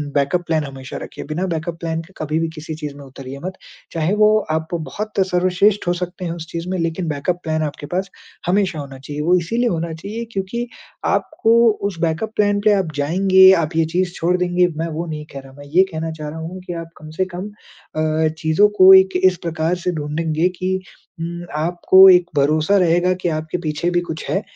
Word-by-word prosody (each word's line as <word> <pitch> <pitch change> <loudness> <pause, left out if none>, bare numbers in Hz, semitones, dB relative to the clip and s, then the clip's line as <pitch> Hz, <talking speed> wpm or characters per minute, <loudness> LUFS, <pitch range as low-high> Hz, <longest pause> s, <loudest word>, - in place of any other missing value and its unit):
Backup 145 +5 +1
plan 160 -2 +1
हमेशा 135 -1 -8
रखिए। - - -8
बिना 175 +5 -1
बैकअप 165 +1 -4
प्लान 165 -1 -2
के 175 +3 -17
कभी 155 +1 -1
भी 165 - 0
किसी 155 +1 -6
चीज़ 150 -2 -6
में 145 - -11
उतरिये 135 0 -9
मत। 190 - -3 0.4
चाहे 165 +3 0
वो 215 0 +5
आप 160 0 -1
बहुत 170 +7 -4 0.2
सर्वश्रेष्ठ 185 +2 +2
हो 175 - +3
सकते 180 +1 -5
हैं 170 - -2
उस 165 -1 -6
चीज़ 170 +1 -5
में 185 - -1
लेकिन 165 +1 -2
बैकअप 155 +4 -2
प्लान 155 0 -1
आपके 145 -1 -5
पास 190 +2 -1 0.4
हमेशा 190 -3 +1
होना 135 -2 -8
चाहिए। 145 +2 -6
वो 175 +4 +3
इसीलिए 230 +8 0
होना 165 -1 -2
चाहिए 205 +8 -6
क्योंकि 215 +4 -3 0.4
आपको 225 +1 +1 0.3
उस 170 -5 -10
बैकअप 170 +6 -1
प्लान 205 -1 +2
पे 210 - +6
आप 190 -5 0
जाएँगे, 190 +6 +5
आप 165 -2 0
ये 165 0 +3
चीज़ 175 +2 -1
छोड़ 175 +2 +1
देंगे, 180 0 +2
मैं 165 +1 -2
वो 165 +2 -3
नहीं 155 -2 -6
कह 140 - -6
रहा। 135 0 -14
मैं 145 - -11
ये 170 +7 +4
कहना 160 0 -3
चाह 155 -1 -6
रहा 160 +2 -7
हूँ 170 +3 -6
कि 175 - -5
आप 165 - -14
कम 155 0 -11
से 185 - +3
कम 195 +4 -5 0.5
अ, 155 0 +1
चीज़ों 160 +5 +4
को 185 +1 +10
एक 190 0 +6
इस 185 -2 +5
प्रकार 165 +1 -1
से 180 - +2
ढूंढेंगे 155 +3 0
कि 185 +1 0 0.4
उम, 170 +1 -5
आपको 175 +4 +5
एक 180 -1 +6
भरोसा 155 +7 +3
रहेगा 175 0 +3
कि 175 - 0
आपके 155 +2 -3
पीछे 155 +1 -1
भी 175 - +2
कुछ 160 -2 -6
है 195 - 0
170 Hz, 215 wpm, -20 LUFS, 155-185 Hz, 0.5 s, को